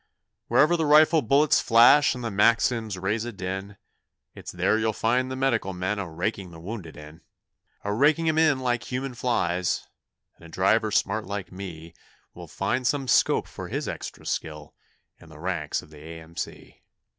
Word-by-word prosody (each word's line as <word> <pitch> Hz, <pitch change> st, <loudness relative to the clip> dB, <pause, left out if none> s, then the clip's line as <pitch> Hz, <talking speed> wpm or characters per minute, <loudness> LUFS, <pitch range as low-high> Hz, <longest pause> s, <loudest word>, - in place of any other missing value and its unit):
'Wherever 150 Hz, +8 st, +4 dB
the 160 Hz, -2 st, 0 dB
rifle 155 Hz, +2 st, +6 dB
bullets 145 Hz, +1 st, +3 dB
flash 120 Hz, +5 st, +5 dB
and 125 Hz, -, -7 dB
the 115 Hz, -, -3 dB
Maxims 115 Hz, 0 st, +2 dB
raise 105 Hz, +4 st, -1 dB
a 120 Hz, -, -5 dB
din, 95 Hz, 0 st, -6 dB, 0.6 s
It's -, -, -9 dB
there 110 Hz, -, +1 dB
you'll 110 Hz, 0 st, 0 dB
find 125 Hz, +4 st, 0 dB
the 130 Hz, -, -4 dB
Medical 120 Hz, -7 st, 0 dB
men 95 Hz, +3 st, -2 dB
a 95 Hz, -4 st, -4 dB
raking 90 Hz, +3 st, -3 dB
the 80 Hz, -1 st, -12 dB
wounded 85 Hz, -3 st, -8 dB
in 75 Hz, +2 st, -12 dB, 0.6 s
A 100 Hz, -, -2 dB
raking 155 Hz, +8 st, +2 dB
'em 160 Hz, 0 st, +2 dB
in 155 Hz, -4 st, +4 dB
like 120 Hz, -2 st, -1 dB
human 130 Hz, +1 st, -3 dB
flies 90 Hz, -8 st, -1 dB, 0.5 s
and -, -, -20 dB
a 85 Hz, -, -12 dB
driver 100 Hz, +6 st, +2 dB
smart 105 Hz, 0 st, 0 dB
like 100 Hz, -2 st, -5 dB
me 85 Hz, -4 st, -9 dB, 0.4 s
Will -, -, -10 dB
find 125 Hz, 0 st, -2 dB
some 140 Hz, -1 st, -1 dB
scope -, -, +3 dB
for -, -, -8 dB
his -, -, -4 dB
extra -, -, -7 dB
skill 75 Hz, -2 st, -5 dB, 0.5 s
in 85 Hz, -, -16 dB
the 80 Hz, -, -14 dB
ranks 85 Hz, -2 st, -3 dB
of 75 Hz, -, -18 dB
the 75 Hz, -, -13 dB
A.M.C.' 80 Hz, +1 st, -9 dB
105 Hz, 175 wpm, -25 LUFS, 90-125 Hz, 0.6 s, rifle